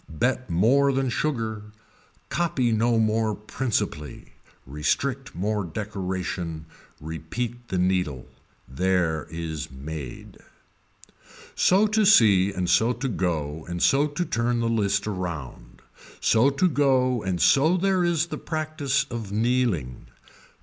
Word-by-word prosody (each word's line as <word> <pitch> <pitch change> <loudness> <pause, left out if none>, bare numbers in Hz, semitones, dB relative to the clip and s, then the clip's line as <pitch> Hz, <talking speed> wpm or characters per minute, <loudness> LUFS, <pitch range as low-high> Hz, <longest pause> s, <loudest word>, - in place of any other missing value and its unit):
Bet 125 +9 -1
more 125 +11 +3
than 135 -1 0
sugar, 115 -6 -2 0.7
copy 150 -8 0
no 115 +1 +2
more 110 -1 +1
principally, 105 - -4 0.3
restrict 125 - -2
more 105 +3 -1
decoration, 90 -3 -4 0.3
repeat 115 +11 -5
the 95 - -2
needle. 90 -7 0 0.4
There 85 +1 0
is 80 -2 -5
made. 70 -1 -8 1.1
So 195 +4 +4
to 215 +1 +2
see 105 - +5
and 90 -2 -2
so 110 +8 +3
to 125 +3 -4
go 80 - -2
and 85 0 -4
so 140 - +3
to 150 +4 -3
turn 120 -5 0
the 115 0 0
list 100 -3 +1
around, 90 -10 -6 0.4
so 115 +5 +4
to 140 +7 +2
go 130 -5 +2
and 95 -3 -2
so 155 - +4
there 190 0 +1
is 170 -2 +1
the - - -6
practice 155 -4 -1
of 115 -4 -5
Nileing. 110 - 0
110 Hz, 120 wpm, -25 LUFS, 85-135 Hz, 1.1 s, see